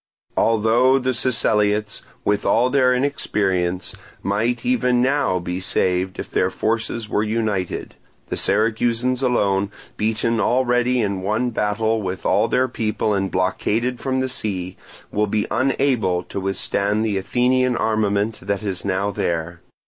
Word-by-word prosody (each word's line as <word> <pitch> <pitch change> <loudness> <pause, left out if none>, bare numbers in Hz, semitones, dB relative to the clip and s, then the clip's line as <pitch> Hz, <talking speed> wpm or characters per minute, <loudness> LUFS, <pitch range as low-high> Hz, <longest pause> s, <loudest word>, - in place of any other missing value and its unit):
Although 115 +4 +3
the 130 -1 0
Siceliots, 105 -4 0 0.2
with 105 0 +1
all 125 +2 +3
their 130 -2 +4
inexperience, 95 -9 0 0.3
might 110 +5 0
even 125 - +2
now 130 -6 +2
be 90 +1 -4
saved 90 0 0
if - - -6
their - - +2
forces 115 0 -2
were 105 - 0
united, 105 -4 -2 0.4
the - - -2
Syracusans 115 +4 +1
alone, 100 -6 +1 0.3
beaten 110 +1 0
already 125 +1 +2
in 100 -3 -1
one 110 +6 0
battle 110 +1 0
with 95 -2 -5
all - - +3
their 130 +1 +2
people 110 -3 -1
and 95 -1 0
blockaded 110 +7 0
from 130 -1 -1
the 130 - 0
sea, 95 -6 -3 0.4
will 105 +1 +1
be 105 +1 0
unable 125 -8 +1
to 100 - -6
withstand 100 +2 0
the 100 -3 0
Athenian 125 +4 +1
armament 110 0 0
that 100 +1 -2
is 95 -4 -3
now 100 +1 0
there. 85 -2 -2
110 Hz, 140 wpm, -21 LUFS, 100-125 Hz, 0.4 s, their